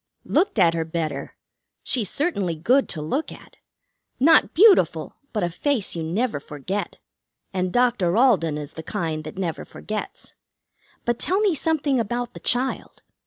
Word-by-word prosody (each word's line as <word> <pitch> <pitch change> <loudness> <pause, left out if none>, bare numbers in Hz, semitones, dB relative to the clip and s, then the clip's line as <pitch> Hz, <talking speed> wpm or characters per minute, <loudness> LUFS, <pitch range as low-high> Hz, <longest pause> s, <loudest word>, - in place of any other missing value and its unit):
"Looked 380 - +1
at 170 -4 +5
her 165 -1 -1
better. 160 -1 -4 0.5
She's 230 -8 0
certainly 205 - -1
good 245 - +2
to 155 -3 -4
look 270 - -2
at. - - -14 0.6
Not 320 +5 +5
beautiful, 395 +3 +5 0.2
but 210 -4 -1
a 175 - +1
face 250 - -1
you 165 - -3
never 175 - -1
forget. 150 +8 -5 0.6
And 185 -1 -1
Doctor 225 -6 +2
Alden 190 - +3
is 145 -1 -7
the 160 - -7
kind 160 -3 -3
that 155 - -8
never 175 -4 -3
forgets. 215 0 -7 0.7
But 240 0 0
tell 375 +2 +1
me 410 -4 +3
something 300 -4 0
about 240 +2 -2
the - - -9
child. 255 +2 -1
205 Hz, 155 wpm, -23 LUFS, 165-265 Hz, 0.7 s, at